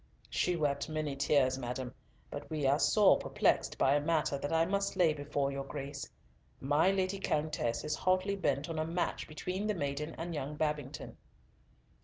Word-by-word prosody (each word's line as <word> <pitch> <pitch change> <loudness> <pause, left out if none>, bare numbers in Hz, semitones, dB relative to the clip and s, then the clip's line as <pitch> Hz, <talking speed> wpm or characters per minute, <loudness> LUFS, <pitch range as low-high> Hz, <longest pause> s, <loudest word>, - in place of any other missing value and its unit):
"She 180 - +1
wept 145 -2 0
many 155 -2 -2
tears, 135 -2 +2
madam, 125 0 -4 0.4
but - - -7
we 155 -3 -2
are 140 +2 +4
sore 210 +2 +5
perplexed - - +1
by 135 - +4
a 145 - +3
matter 155 -2 +1
that 140 +1 -3
I 165 0 +3
must 200 +2 0
lay 165 -4 +4
before 145 -1 -1
your 140 0 -3
Grace. 140 0 -6 0.5
My 145 +6 +3
Lady 195 0 0
Countess 150 -9 -1
is 150 - -1
hotly 185 +2 +1
bent 145 -6 0
on 165 -2 -3
a 155 - -1
match 170 +2 -2
between 185 +6 -3
the 210 - 0
maiden 145 0 -3
and 170 +1 -4
young 150 -1 -4
Babington." 150 -2 -3
150 Hz, 175 wpm, -33 LUFS, 140-170 Hz, 0.5 s, sore